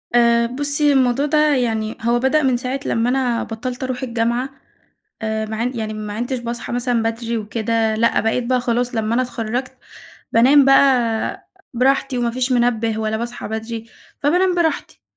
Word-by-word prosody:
آآ 235 -1 +4
بُصّي 285 +3 +1
الموضوع 260 +1 +2
ده 300 -1 +3
يعني 220 -3 -1
هو 235 +1 +1
بدأ 280 +4 +2
من 255 -2 +2
ساعة 255 +2 -3
لما 230 +2 +1
أنا 250 -3 0
بطّلت 245 +3 -5
اروح 255 0 -3
الجامعة، 235 +2 -1 0.7
آآ 220 0 -1
ما 220 0 -5
عن 240 +3 -1
يعني 215 -1 -3
ما 210 -1 -5
عنتش 245 +4 -3
باصحى 235 0 -5
مثلًا 245 -1 0
بدري 230 +1 -2
وكده، 220 +1 -1
لأ 230 +2 +2
بقيت 230 +2 0
بقى 255 0 +1
خلاص 245 0 -1
لما 220 +1 0
أنا 255 - +2
اتخرّجت 245 +1 -4 0.6
بانام 265 +4 +6
بقى 255 -5 +2 0.3
براحتي، 265 +1 +1
وما 240 -1 0
فيش 255 +2 -1
منبة 230 -2 +1
ولا 220 0 -1
باصحى 240 0 -5
بدري، 225 +1 -5 0.4
فبانام 360 +5 +2
براحتي، 335 -2 -1
240 Hz, 165 wpm, -20 LUFS, 225-260 Hz, 0.7 s, بانام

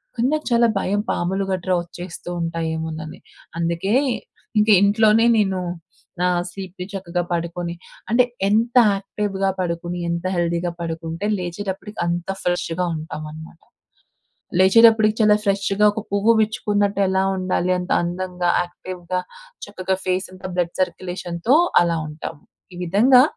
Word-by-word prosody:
కానీ 240 +1 +1
నాకు 310 0 -1
చాలా 235 0 +5
భయం 205 +2 0
పాములు 190 +3 -1
గట్రా 185 0 -1
వచ్చేస్తూ 175 0 -9
ఉంటాయేమోనని. 160 -1 -4 0.4
అందుకే 170 +3 -1 0.7
ఇంక 210 - +3
ఇంట్లోనే 215 +2 +4
నేను, 190 -3 +1 0.6
నా 180 - +3 0.2
స్లీప్‌ని 185 -1 -7
చక్కగా 180 -2 -2
పడుకొని 170 0 -3 0.4
అంటే 250 +1 +5 0.3
ఎంత 230 +4 +1 0.2
యాక్టివ్‌గా 195 0 -2
పడుకొని 175 0 -2
ఎంత 170 +1 -2
హెల్తీగా 170 0 0
పడుకుంటే 165 +2 -4
లేచేటప్పటికి 190 +3 -5
అంత 170 0 -2 0.2
ఫ్రెష్‌గా 175 0 -1
ఉంటామనమాట. 155 +1 -8 1.0
లేచేటప్పటికి 220 +2 +6
చాలా 210 -1 +6
ఫ్రెష్‌గా 200 0 +1
ఒక 220 - -3
పువ్వు 205 +3 +4
విచ్చుకున్నట్టు 205 -2 0
ఎలా 190 0 +2
ఉండాలి 185 -1 0
అంత 180 - -5
అందంగా, 180 0 -2
యాక్టివ్‌గా 180 0 -5 0.5
చక్కగా 190 -2 -2
ఫేసంతా 185 0 -3
బ్లడ్ 175 -1 -1
సర్క్యులేషన్‌తో 180 +4 -1 0.3
అలా 170 -1 +1
ఉంటాం. 155 +1 -7 0.4
ఈ - - -10
విధంగా 240 +9 +6
185 Hz, 120 wpm, -21 LUFS, 170-205 Hz, 1.0 s, లేచేటప్పటికి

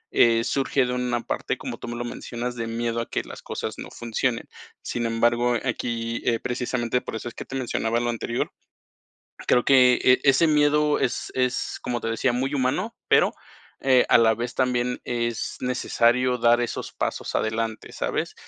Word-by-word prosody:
eh, 115 -1 +5
surge 135 +1 +1
de 125 - -2
una 125 -1 -1
parte, - - -3
como - - -6
tú - - -7
me 120 - -4
lo 120 0 -4
mencionas, 120 0 -5
de 115 -1 -4
miedo 115 0 -2
a 115 - -6
que - - -2
las - - -10
cosas - - -5
no - - -7
funcionen. 120 +1 -2 0.4
Sin 120 -1 -2
embargo, 120 +1 +2
aquí, 115 -2 -2
eh, 115 -1 +2
precisamente 125 0 -1
por - - -6
eso 110 - -5
es 120 - -6
que - - -8
te 135 - -7
mencionaba 120 -3 -1
lo 120 0 -1
anterior. 120 +1 -2 1.0
Creo 125 - +3
que, 125 -2 +6
eh, 125 0 +5
ese 140 +4 +5
miedo 150 -1 +3
es 130 -3 -1
es, 125 -1 -1
como 120 -1 -2
te 115 - -3
decía, 115 +3 +1
muy 135 +3 -1
humano, 145 - 0
pero, - - +4 0.5
eh, 130 -2 +4
a - - +6
la 110 -1 +5
vez 120 +2 -4
también 125 -1 0
es 120 -1 -2
necesario 125 0 +2
dar 120 0 +4
esos 120 - -3
pasos - - -2
adelante, 110 0 -2
¿sabes? - - -2
120 Hz, 180 wpm, -24 LUFS, 115-125 Hz, 1.0 s, que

